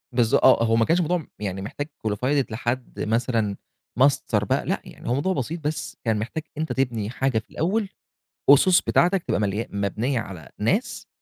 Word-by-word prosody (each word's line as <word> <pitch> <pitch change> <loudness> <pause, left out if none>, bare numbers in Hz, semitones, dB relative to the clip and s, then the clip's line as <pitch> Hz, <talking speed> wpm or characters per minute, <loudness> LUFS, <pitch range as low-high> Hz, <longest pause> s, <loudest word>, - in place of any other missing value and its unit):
بالض 120 -3 +3
آه، 115 - +5
هو 115 0 +2
ما 115 -1 +3
كانش 175 +2 +3
موضوع 175 +2 +1
م 160 - -8
يعني 95 -2 -3
محتاج 145 +8 -5 0.2
qualified 130 +7 +1
لحد 120 +2 -3
مثلًا 115 -2 0 0.4
master 140 +1 +3
بقى - - 0
لأ، - - -1
يعني - - -9
هو - - +2
موضوع 165 +8 0
بسيط 160 +4 -3
بس 150 0 -4
كان 110 -2 +1
محتاج 150 +8 -4
أنت 160 +1 -2
تبني 120 -5 -1
حاجة 130 -2 0
في - - -16
الأول، 195 +5 -1 0.6
أُسُس 175 +6 +7
بتاعتك 180 0 +2
تبقى - - -1
مليا 105 +2 -1
مبنيّة 110 +6 -1
على 90 -8 -8
ناس 190 - -1
125 Hz, 180 wpm, -24 LUFS, 110-155 Hz, 0.6 s, أُسُس